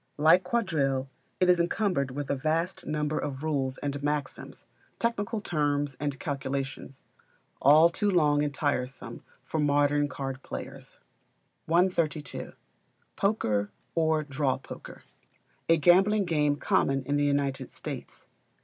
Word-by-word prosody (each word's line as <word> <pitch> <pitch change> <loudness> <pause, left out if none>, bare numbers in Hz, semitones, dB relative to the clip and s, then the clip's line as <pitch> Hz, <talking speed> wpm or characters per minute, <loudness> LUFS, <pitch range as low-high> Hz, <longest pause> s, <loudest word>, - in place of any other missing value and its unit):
Like 160 +5 +5
Quadrille, 155 - 0 0.3
it 185 - +3
is 180 -1 +5
encumbered 170 -5 0
with 140 +2 -4
a - - +1
vast 160 +6 -1
number 150 0 -1
of 140 0 -4
rules 135 -4 -1
and 145 0 -4
maxims, 145 -1 -4 0.3
technical 230 -1 -1
terms 145 -5 -1
and 145 -2 -3
calculations; 135 -1 -4 0.6
all 150 +4 +7
too 205 +4 +1
long 150 -6 +3
and 150 -1 0
tiresome 130 -4 -3 0.2
for 155 +4 -2
modern 145 0 +2
card 135 -1 -5
players. - - -8 0.7
132. 165 -3 0 0.6
Poker, 110 - 0 0.2
or 160 -2 +2
Draw 140 -2 -1
Poker, 135 - -11 0.7
a 165 - +6
gambling 195 +6 +4
game 150 -4 +2
common 135 -1 +1
in 145 +2 0
the 145 - +2
United 140 -1 -1
States. - - -8
145 Hz, 125 wpm, -28 LUFS, 140-165 Hz, 0.7 s, all